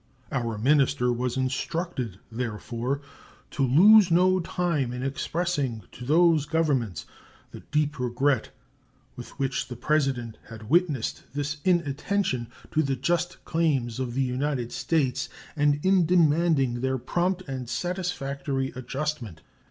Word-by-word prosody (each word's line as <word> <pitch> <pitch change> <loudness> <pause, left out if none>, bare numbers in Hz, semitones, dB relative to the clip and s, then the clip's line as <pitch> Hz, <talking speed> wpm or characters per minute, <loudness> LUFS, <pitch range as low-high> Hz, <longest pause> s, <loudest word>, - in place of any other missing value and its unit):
Our 115 -2 -2
minister 135 0 +3
was 125 +1 -2
instructed, 130 - -2
therefore, 120 +3 -3 0.5
to - - -3
lose 185 - +7
no 185 +2 +4
time 170 -7 -1
in 125 +1 -4
expressing 140 - -2
to 125 - -10
those 160 0 +4
Governments 145 - 0 0.5
the - - -9
deep 150 -1 -1
regret 125 0 +1 0.7
with 120 - -10
which 135 -2 -1
the 125 - -7
President 130 -4 0
had 110 +1 -10
witnessed 160 -8 +1
this 145 +1 -2
inattention 170 -5 0 0.2
to 155 - +2
the 135 -3 0
just 175 +7 -1
claims 135 -8 0
of 125 -2 -3
the 135 - +2
United 130 -1 -2
States 145 -6 0 0.3
and 145 -1 +2
in 190 -3 +4
demanding 155 -7 +3
their 130 0 0
prompt 180 +8 -1
and 130 -3 -5
satisfactory 140 -5 -2
adjustment. 130 - -4
140 Hz, 125 wpm, -26 LUFS, 125-165 Hz, 0.7 s, lose